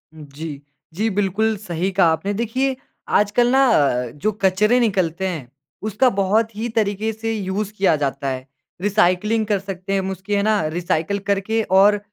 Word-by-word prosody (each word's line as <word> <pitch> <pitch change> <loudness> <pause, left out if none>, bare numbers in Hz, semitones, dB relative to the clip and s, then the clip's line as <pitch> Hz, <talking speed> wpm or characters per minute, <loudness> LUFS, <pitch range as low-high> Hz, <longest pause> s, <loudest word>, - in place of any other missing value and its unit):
जी। 150 -1 -8 0.3
जी, 215 +6 0
बिल्कुल 205 +2 0
सही 185 -2 -3
कहा 185 -2 +4
आपने। 175 +6 -1
देखिए 255 +5 -1 0.4
आजकल 210 +4 +2
ना 270 +1 +5
अ, 135 - +2
जो 180 +9 -1
कचरे 210 +6 +3
निकलते 190 -5 0
हैं, 150 -9 -5 0.3
उसका 215 +5 +2
बहुत 215 +2 +1
ही 225 +3 -3
तरीक़े 215 0 0
से 225 +1 -3
यूज़ 200 0 -3
किया 190 -4 +3
जाता 140 0 -2
है। 130 -1 -4 0.4
रिसाइक्लिंग 210 +2 +2
कर 205 -2 +1
सकते 195 0 -5
हैं 195 - +2
हम 190 - -3
उसकी 190 +2 -5
है 200 - +2
ना, 215 -2 +2
रिसाइकिल 170 +3 -1
करके 200 +3 +1 0.2
और 205 +1 +5
200 Hz, 170 wpm, -21 LUFS, 175-215 Hz, 0.4 s, ना